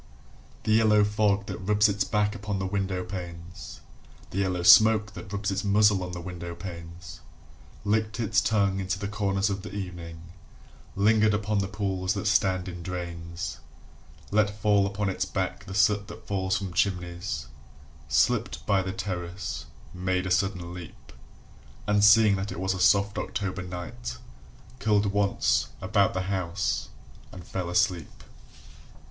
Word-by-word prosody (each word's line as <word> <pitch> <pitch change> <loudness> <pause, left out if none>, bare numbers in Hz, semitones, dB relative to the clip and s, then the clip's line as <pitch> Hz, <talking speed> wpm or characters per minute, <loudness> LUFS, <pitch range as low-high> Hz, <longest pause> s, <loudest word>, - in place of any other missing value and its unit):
The 110 - 0
yellow 110 -1 +5
fog 105 -1 +1
that 100 - -6
rubs 105 +3 +3
its 100 0 0
back 105 -1 0
upon 105 -1 -4
the 95 - -2
window 95 -1 -2
panes 90 -2 -8 0.5
The 95 - -2
yellow 90 -2 0
smoke 105 +2 +7
that 100 - -9
rubs 100 0 -2
its 95 +1 -2
muzzle 105 -1 +4
on 90 0 -4
the 90 - -5
window 85 -1 -6
panes 85 -1 -9 0.7
Licked 110 +1 0
its 105 -4 +2
tongue 100 -3 +1
into 95 0 -2
the 100 0 -4
corners 100 -1 0
of 100 0 -3
the 105 - -8
evening 85 -3 -7 0.6
Lingered 105 +1 +4
upon 105 0 0
the 95 - 0
pools 95 -2 -2
that 100 - -3
stand 95 -4 +2
in 90 -1 -7
drains, 85 -1 -5 0.7
Let 105 0 +1
fall 100 -1 +3
upon 100 +1 -2
its 95 - -1
back 95 +1 -3
the 95 -2 -7
soot 105 0 +3
that - - -11
falls 95 -1 0
from 95 -3 -5
chimneys, 90 -6 -1 0.6
Slipped 115 - +1
by 100 -2 +3
the 95 0 -3
terrace, 95 -1 -5 0.3
made 90 0 -1
a 90 - -3
sudden 90 -2 0
leap, 90 -2 -11 0.7
And 105 -1 +2
seeing 105 -1 +7
that 100 +2 -4
it - - -6
was 95 0 0
a 95 - -5
soft 100 +2 +3
October 100 -3 -3
night, 85 -9 -6 0.6
Curled 105 -2 +2
once 100 -1 +2
about 100 0 +2
the 95 - 0
house, 95 -1 -2 0.4
and 90 - -10
fell 90 -2 -4
asleep. 90 -3 0
95 Hz, 155 wpm, -27 LUFS, 90-105 Hz, 0.7 s, smoke